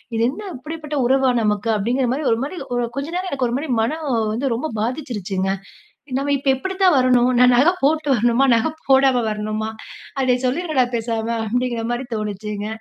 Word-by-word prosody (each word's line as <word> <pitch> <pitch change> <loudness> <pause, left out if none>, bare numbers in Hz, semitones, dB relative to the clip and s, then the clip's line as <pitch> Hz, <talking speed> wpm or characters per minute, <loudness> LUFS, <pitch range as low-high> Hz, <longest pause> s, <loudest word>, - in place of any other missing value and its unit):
இது 225 - 0
என்ன 395 +10 -7
இப்படிப்பட்ட 305 +2 -6
உறவா 265 +1 +3
நமக்கு? 210 0 0
அப்டிங்கிற 245 +5 0
மாரி 295 +4 -3
ஒரு 225 - +2
மாதிரி, 300 +7 -5 0.2
ஒரு 245 - 0
கொஞ்ச 280 +1 -2
நேரம் 370 +1 -2
எனக்கு 265 -3 0
ஒரு 235 - -3
மாரி 295 +2 -5
மனம் 305 +6 -2 0.3
வந்து 255 +5 -1
ரொம்ப 260 +7 -2
பாதிச்சிருச்சுங்க. 215 - -2 0.7
நம்ம 285 +1 -1
இப்ப 275 0 -1
எப்டி 380 +8 -4
தான் 365 -4 +6
வரணும்? 255 -1 +4
நான் 250 0 +6
நகை 305 +8 +5
போட்டு 305 +2 +2
வரணுமா? 240 +3 +3
நகை 230 +7 +1 0.2
போடாம 265 -2 +4
வரணுமா? 215 +1 -3 0.5
அடேய் 250 -1 +1
சொல்லிடுங்கடா 275 0 +1
பேசாம, 225 -1 -2 0.2
அப்டிங்கிற 240 0 -1
மாதிரி 245 +2 -3
தோணுச்சுங்க. 210 0 -4
250 Hz, 175 wpm, -21 LUFS, 225-280 Hz, 0.7 s, தான்